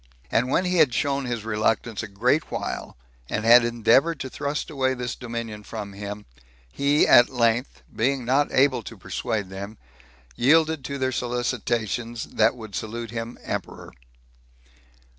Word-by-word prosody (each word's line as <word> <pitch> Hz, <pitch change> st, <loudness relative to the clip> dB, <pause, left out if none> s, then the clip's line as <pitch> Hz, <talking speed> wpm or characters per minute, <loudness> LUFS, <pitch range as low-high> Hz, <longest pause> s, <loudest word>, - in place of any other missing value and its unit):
And 125 Hz, +3 st, +2 dB
when 180 Hz, -, +2 dB
he 180 Hz, 0 st, 0 dB
had 145 Hz, -6 st, +4 dB
shown 140 Hz, -1 st, 0 dB
his 120 Hz, -3 st, -4 dB
reluctance 110 Hz, 0 st, 0 dB
a 110 Hz, -, -6 dB
great 125 Hz, +10 st, +1 dB
while, -, -, -5 dB, 0.3 s
and 110 Hz, -, -2 dB
had 120 Hz, +1 st, +8 dB
endeavored 120 Hz, +7 st, +3 dB
to 130 Hz, -, -5 dB
thrust 145 Hz, +2 st, -3 dB
away 130 Hz, -2 st, 0 dB
this 125 Hz, -1 st, -4 dB
dominion 115 Hz, -3 st, -6 dB
from 105 Hz, -2 st, -7 dB
him, 105 Hz, +1 st, -7 dB, 0.5 s
he 140 Hz, -, +2 dB
at 120 Hz, -, +7 dB
length, 120 Hz, 0 st, 0 dB
being 130 Hz, +2 st, 0 dB
not 135 Hz, +4 st, +2 dB
able 130 Hz, -2 st, +3 dB
to -, -, -10 dB
persuade 105 Hz, -5 st, -3 dB
them, 100 Hz, +3 st, -7 dB, 0.6 s
yielded 155 Hz, +3 st, +3 dB
to 140 Hz, -, -4 dB
their 130 Hz, -1 st, 0 dB
solicitations 120 Hz, -2 st, -2 dB
that 110 Hz, +2 st, +2 dB
would 110 Hz, -4 st, -10 dB
salute 115 Hz, +2 st, -5 dB
him 115 Hz, 0 st, -5 dB
emperor. -, -, -5 dB
120 Hz, 150 wpm, -24 LUFS, 110-135 Hz, 0.6 s, had